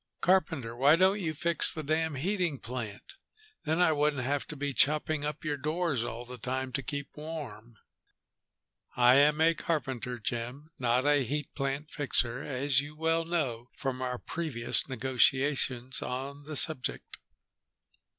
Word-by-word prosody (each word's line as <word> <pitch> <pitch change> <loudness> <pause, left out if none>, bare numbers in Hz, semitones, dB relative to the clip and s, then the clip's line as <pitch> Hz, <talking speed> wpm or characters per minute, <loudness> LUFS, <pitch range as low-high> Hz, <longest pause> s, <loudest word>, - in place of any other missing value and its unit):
"Carpenter, 160 -11 +1
why 140 +5 +5
don't 190 +4 +3
you 160 -5 -2
fix 170 +2 +3
the 155 - -6
damn 160 +1 0
heating 175 0 -1
plant? 120 - -7 0.5
Then 160 +2 0
I 180 -2 +5
wouldn't 145 -3 +1
have 140 +2 -1
to 155 - -6
be 145 -1 -3
chopping 150 +2 +3
up 150 +1 -4
your 150 -1 -1
doors 155 -3 -1
all 120 +1 -6
the 125 0 -9
time 130 +2 -3
to 135 - -2
keep 140 0 -6
warm." 140 -8 -8 1.2
"I 125 +1 +6
am 150 +2 +4
a 165 +1 +5
carpenter, 130 -7 -3
Jim, 120 +7 -5
not 125 +1 +1
a 145 -1 +4
heat 145 +5 -4
plant 140 +2 -3
fixer, 130 -4 0
as 135 0 +1
you 145 +1 -9
well 165 +1 0
know 130 -9 -2
from 130 -2 -3
our 125 -1 -2
previous 140 -6 0
negotiations 130 0 +1
on 140 +3 -5
the 155 0 -6
subject." 140 -2 +1
140 Hz, 150 wpm, -30 LUFS, 125-155 Hz, 1.2 s, I